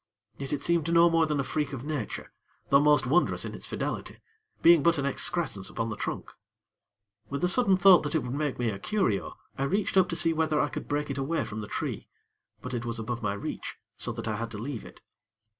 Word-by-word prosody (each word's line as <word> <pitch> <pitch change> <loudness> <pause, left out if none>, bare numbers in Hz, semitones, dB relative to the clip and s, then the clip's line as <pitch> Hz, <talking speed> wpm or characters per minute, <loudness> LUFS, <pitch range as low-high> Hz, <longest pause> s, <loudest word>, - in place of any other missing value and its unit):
Yet 135 -1 -5
it 145 -1 -2
seemed 170 -1 +1
no 170 0 +6
more 165 -1 +3
than 150 -2 -1
a - - +1
freak 145 +1 -2
of 130 -2 -5
nature, 145 -8 -4 0.4
though 140 - +6
most 150 -1 +4
wondrous 165 +8 +2
in - - -6
its - - -1
fidelity; - - -4 0.5
being 170 -2 +7
but 170 +2 +3
an 140 - -1
excrescence 140 - 0
upon 115 - -3
the - - -3
trunk. - - -4 1.0
With 140 +3 -4
a - - +4
sudden 195 0 +3
thought 185 -2 +7
that 145 +1 -3
it 160 - +1
would 125 - -4
make 145 -1 -2
me 120 -2 0
a 100 - -6
curio, 115 - -1 0.2
I - - +1
reached 195 +5 0
up 185 -1 +5
to 165 - -2
see 165 -1 +2
whether 155 -1 +1
I 145 - +1
could - - -6
break 145 0 -1
it 140 - -4
away 145 +2 -1
from 110 +1 -6
the 105 - -7
tree; - - -4 0.6
but 130 - -6
it 120 -1 -2
was 120 -1 -3
above 115 +1 -4
my 105 -2 -1
reach, 100 - -5 0.2
so - - 0
that - - -6
I 110 -1 -1
had 115 +1 -4
to 110 - -7
leave 120 +2 -5
it. - - -14
145 Hz, 235 wpm, -28 LUFS, 120-165 Hz, 1.0 s, being